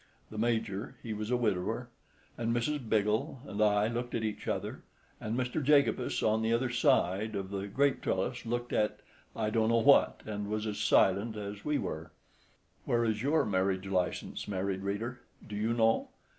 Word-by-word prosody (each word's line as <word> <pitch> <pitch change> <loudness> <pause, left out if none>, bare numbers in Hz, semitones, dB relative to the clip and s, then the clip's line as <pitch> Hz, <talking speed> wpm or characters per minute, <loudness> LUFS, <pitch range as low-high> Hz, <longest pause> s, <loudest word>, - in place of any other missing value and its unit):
The 110 - -5
Major 110 -3 -1
(he 110 - -3
was 105 +1 -4
a 125 - +2
widower) 100 -7 -1 0.5
and 115 0 -1
Mr. 145 +6 0
Biggle 110 0 0
and 105 -5 -4
I 105 0 +4
looked 120 +1 -3
at 115 - -1
each 110 -1 -4
other; - - -3 0.4
and 110 +2 -3
Mr. 130 +4 -1
Jacobus, 140 -3 +3
on 110 +1 +2
the 110 0 +1
other 120 +2 +1
side 110 -2 +2
of 95 0 -4
the 100 0 -3
grape 140 +7 +1
trellis, 110 +7 -1
looked 120 +1 -3
at—I 105 0 -2
don't 110 0 +2
know 115 - +4
what—and 110 -5 +3
was 105 0 -2
as 105 -1 -3
silent 105 +1 +3
as 100 0 -6
we 150 -1 +1
were. 80 +1 -4 0.7
Where 120 -1 +2
is 110 -2 0
your 150 +5 +2
marriage 95 -1 0
license, 90 -2 -2
married 95 -1 -2
reader? 110 +5 -3 0.3
Do 105 - -6
you 110 +2 0
know? 115 -1 +2
110 Hz, 170 wpm, -31 LUFS, 100-120 Hz, 0.7 s, I